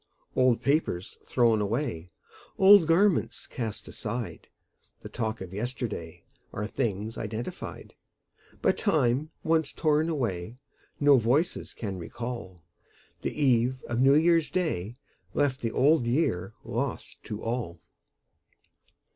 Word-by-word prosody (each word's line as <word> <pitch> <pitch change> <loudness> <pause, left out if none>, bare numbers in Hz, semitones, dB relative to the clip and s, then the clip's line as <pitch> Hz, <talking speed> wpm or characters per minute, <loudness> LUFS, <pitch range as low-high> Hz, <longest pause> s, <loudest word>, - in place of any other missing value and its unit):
Old 130 -2 +3
papers 135 - 0
thrown 115 -3 +3
away, 105 - -2 0.5
Old 195 -3 +8
garments 180 +3 +2
cast 115 -5 -5
aside, 115 +2 -5 0.6
The - - -7
talk 110 -2 -3
of 95 -1 -7
yesterday, 110 -7 -4 0.3
Are 105 - -3
things 105 +1 -2
identified; 110 +2 -6 0.7
But - - +2
time 130 +6 +2
once 160 -2 +2
torn 155 0 +1
away 115 - -2 0.4
No 145 -2 +6
voices 130 +10 0
can 100 -5 -5
recall: 105 -3 -6 0.6
The - - -4
eve 130 -2 +3
of 120 0 -3
New 135 +2 +6
Year's 165 0 +4
Day 120 - -2 0.4
Left 140 -2 +1
the 115 - -1
Old 140 -1 +3
Year 105 - 0
lost - - -4
to 105 - -6
all. 115 -8 -3
120 Hz, 115 wpm, -28 LUFS, 105-145 Hz, 0.7 s, Old